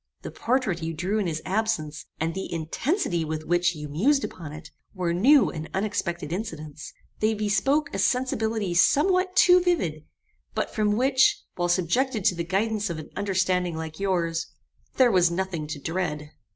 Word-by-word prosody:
The - - -6
portrait 235 -8 -1
you 165 0 -3
drew 190 +7 -1
in 200 - 0
his 155 -2 -3
absence, 195 -7 -2
and 165 +1 -1
the 190 +2 -5
intensity 170 - -1
with 155 0 -4
which 175 0 +2
you 150 -1 -6
mused 255 - +2
upon 160 -5 -6
it, 155 +2 -10 0.2
were 175 -2 -1
new 260 +10 +5
and 160 -1 -6
unexpected 190 -5 -2
incidents. 155 -7 -6 0.3
They 215 +1 +2
bespoke 270 +8 +1
a 195 - -2
sensibility 220 -5 0
somewhat 365 - +3
too 360 -1 +6
vivid; 180 - 0 0.5
but - - -2
from 210 -2 +1
which, 260 +4 +3
while 175 0 -1
subjected 210 +6 +1
to 180 - +4
the 170 - -2
guidance 205 +4 -1
of 170 - -4
an 155 - -9
understanding 185 -3 0
like 160 -1 -6
yours, 170 -4 0 0.5
there 255 -2 +5
was 180 -3 +4
nothing 170 -3 -3
to 150 - -5
dread. 150 -2 -3
185 Hz, 165 wpm, -25 LUFS, 165-225 Hz, 0.5 s, too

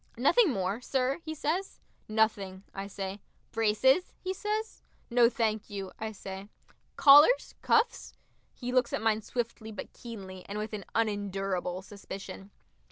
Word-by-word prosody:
"Nothing 360 - +5
more, 195 +1 -1
sir?" 265 +2 0
he 315 -1 -5
says. 335 +6 -2 0.3
"Nothing," 205 -3 +1
I 195 0 -5
say. 195 0 -5 0.3
"Braces?" 225 +9 +3
he 375 0 -3
says. 425 +3 -3 0.3
"No, 235 -1 +6
thank 220 -3 -1
you," 195 -2 -5
I 220 0 -3
say. 195 -1 -8 0.5
"Collars, 295 - +7
cuffs?" 455 +2 +1 0.4
He 250 -1 -4
looks 250 -1 +2
at - - 0
mine 220 -1 +2
swiftly 230 -1 -4
but 210 - -8
keenly, 190 -6 -9
and 205 - -4
with 215 +1 -4
an 200 -3 -5
unendurable 195 -4 -1
suspicion. 195 -1 -9
220 Hz, 140 wpm, -30 LUFS, 195-260 Hz, 0.5 s, Collars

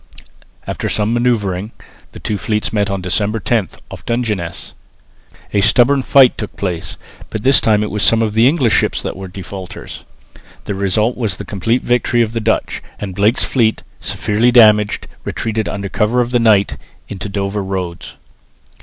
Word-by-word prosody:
After - - -3
some 105 +2 0
manoeuvring 110 -4 0 0.4
the - - -10
two 105 -2 -3
fleets 105 +5 -2
met 105 -1 +1
on 100 -1 -2
December 105 +4 -1
10, 110 -3 0 0.2
off - - -9
Dungeness. 105 -8 -3 0.8
A 100 - +3
stubborn 125 +6 +4
fight 130 0 +5
took 105 - -6
place, 90 -4 -4 0.3
but 110 - -5
this 135 0 +5
time 105 -1 +2
it 105 - -4
was 105 - -2
some 115 +1 +4
of 110 -2 -1
the 115 +3 +5
English 135 -6 +2
ships - - +2
that - - -4
were 95 0 -7
defaulters. 95 0 -8 0.6
The 105 - -3
result 100 +4 0
was 110 -6 -1
the - - -7
complete 115 +5 -1
victory 120 -1 +2
of 110 0 -4
the 115 - -1
Dutch; 110 0 -1 0.2
and 100 -2 -5
Blake's 105 +5 +2
fleet, 115 -4 +1 0.2
severely 105 +5 0
damaged, 105 -4 +5 0.2
retreated 110 -1 -2
under 100 0 -4
cover 105 +5 0
of 120 0 0
the 120 - +2
night 105 -4 +3 0.3
into 100 0 -6
Dover 100 0 -2
roads. 95 -3 -5
105 Hz, 170 wpm, -17 LUFS, 100-115 Hz, 0.8 s, fight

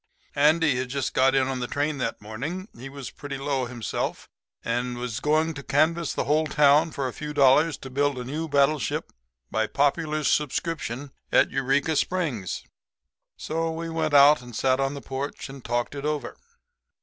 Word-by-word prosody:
Andy 150 -1 +3
had 130 0 -2
just 135 0 -2
got 130 +1 +4
in 135 -1 +3
on 135 -1 -2
the 125 - -2
train 145 +1 -1
that 115 - -2
morning. 145 - -5
He 130 +3 -9
was 140 -1 -8
pretty 145 -1 -7
low 135 -2 -1
himself, 120 -3 -4 0.4
and 120 +1 -1
was 120 -1 -4
going 155 +3 +1
to 145 - -7
canvass 160 +4 +1
the - - -1
whole 155 +4 +2
town 150 +2 +4
for 140 -4 -3
a 125 - -5
few 150 -1 -6
dollars 145 +2 +5
to 135 - -9
build 140 0 +1
a 125 - -4
new 150 +6 -4
battleship 140 -2 +1 0.4
by 110 0 +1
popular 150 +3 0
subscription 145 -2 -1 0.2
at - - +4
Eureka 135 +4 +1
Springs. 145 - -1 0.7
So 165 +1 -2
we 165 +1 -4
went 160 -2 0
out 145 0 +7
and 120 -2 -11
sat 130 +2 +2
on 135 +1 0
the 140 - -7
porch 135 +2 -5
and 135 -2 -10
talked 120 +2 -1
it 140 -1 -6
over. 150 -1 -2
140 Hz, 180 wpm, -25 LUFS, 130-155 Hz, 0.7 s, out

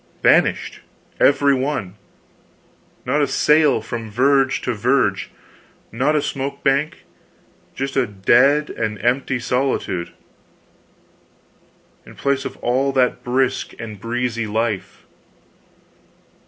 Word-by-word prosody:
Vanished, - - +2 0.4
every 140 0 +4
one! 130 -8 -2 1.1
Not 140 +4 +1
a 145 - +2
sail, 150 -3 +3
from 115 0 -6
verge 135 +4 +2
to 125 - -2
verge, 115 -2 +1 0.6
not 135 +6 +1
a 150 - +1
smoke 140 0 -4
bank 140 +3 0 0.7
just 135 +1 -4
a 135 -2 +2
dead 125 +9 +3
and 110 -2 -3
empty 130 +1 +1
solitude, 125 -8 -2 1.9
in - - -15
place 140 -1 -1
of - - -6
all 130 +3 +1
that 125 -2 +1
brisk 130 +1 -1
and 110 -3 -8
breezy 115 0 -2
life. 110 -1 -3
130 Hz, 105 wpm, -20 LUFS, 115-140 Hz, 1.9 s, every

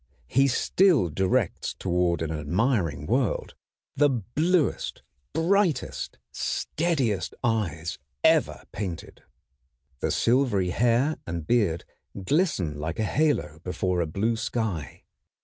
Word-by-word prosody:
He 135 - +3
still 150 - +3
directs 95 +5 0
toward 90 -2 +1
an 80 - -3
admiring 80 - 0
world 120 - 0 0.4
the 145 +1 +4
bluest, 145 - 0 0.3
brightest, 175 -4 0
steadiest 130 - -1
eyes 85 -8 -1 0.2
ever - - +3
painted. 90 -5 -6 0.8
The - - -1
silvery 115 -8 +2
hair 120 - +2
and 85 -2 -4
beard 100 -7 +1 0.4
glisten 120 - +1
like 80 +3 -3
a 110 - 0
halo 110 - 0
before 90 0 -1
a 85 - -1
blue 110 +9 0
sky. 100 - -3
110 Hz, 105 wpm, -26 LUFS, 85-135 Hz, 0.8 s, the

